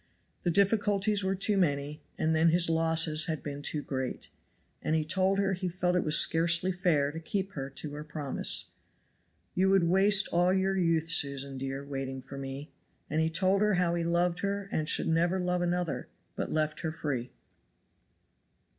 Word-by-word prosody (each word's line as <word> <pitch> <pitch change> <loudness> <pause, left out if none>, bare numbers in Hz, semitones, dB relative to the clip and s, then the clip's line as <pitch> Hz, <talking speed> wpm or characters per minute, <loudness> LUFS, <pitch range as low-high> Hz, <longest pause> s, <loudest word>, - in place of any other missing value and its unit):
The 175 - -1
difficulties 200 +2 +1
were 190 0 0
too 200 +2 +1
many, 150 -3 -1 0.2
and 160 0 +1
then 160 +1 +4
his 170 0 +2
losses 160 -1 +3
had 160 -3 -4
been 145 -1 -6
too 150 0 -2
great. 130 -2 -5 0.5
And 155 - 0
he 155 -1 0
told 190 +4 +1
her 195 -1 +1
he 185 0 -3
felt 180 0 -1
it 180 - +1
was 155 0 +4
scarcely 170 +2 +3
fair 165 -6 +1
to 160 - -7
keep 195 +4 -3
her 135 -5 -6
to 140 +2 -7
her 150 +1 -6
promise. 150 -3 0 0.8
"You 190 +1 +2
would 195 -2 +4
waste 195 +3 +4
all 175 +1 +2
your 190 0 +1
youth, 165 -3 +2
Susan, 140 -3 +2
dear, 135 +1 -5
waiting 135 -2 -5
for 135 +1 -9
me." 135 +2 -7 0.4
And 155 +1 +1
he 160 - +1
told 185 +4 +1
her 210 -2 +2
how 175 -1 +1
he 170 -1 -1
loved 170 +1 0
her 200 0 -3
and 155 0 -1 0.2
never 170 +3 +1
should 180 - -3
love 180 0 0
another; 175 -2 -2 0.3
but - - -3
left 155 -1 -1
her 160 - -3
free. 145 -6 -4
165 Hz, 180 wpm, -29 LUFS, 150-185 Hz, 0.8 s, then